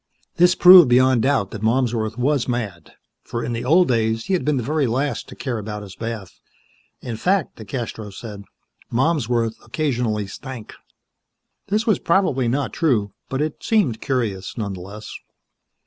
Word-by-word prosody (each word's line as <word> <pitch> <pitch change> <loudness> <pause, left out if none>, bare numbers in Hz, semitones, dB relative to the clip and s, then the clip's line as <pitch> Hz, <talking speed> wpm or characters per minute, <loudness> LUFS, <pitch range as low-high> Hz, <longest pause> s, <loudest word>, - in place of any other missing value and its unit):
This 180 +1 +5
proved 180 -6 +9
beyond 130 0 +4
doubt 130 -7 +1
that 110 - -7
Malmsworth 115 -1 0
was 135 +1 +1
mad, 110 -9 -4 0.3
for 115 - -4
in 120 - -3
the 115 - -3
old 170 +7 +4
days 115 -2 0
he 195 - -1
had 185 - +1
been 150 -2 +1
the 125 - -1
very 150 +1 0
last 135 +5 -2
to - - -10
care 125 -5 -3
about 105 0 -6
his 95 -2 -11
bath. 115 -4 -6 0.6
In 115 -3 -5
fact, 185 - 0
DeCastros 110 -3 -6
said, 105 -3 -8 0.5
Malmsworth 120 -4 0
occasionally 120 -5 -1
stank. 120 +3 -9 0.9
This 215 +3 0
was 215 -4 +2
probably 165 -9 +1
not 135 +3 -1
true, 110 - +1 0.2
but 135 +2 -1
it 155 -1 -5
seemed 185 - +1
curious, 115 -8 -2
nonetheless. 100 0 -6
120 Hz, 155 wpm, -21 LUFS, 110-145 Hz, 0.9 s, proved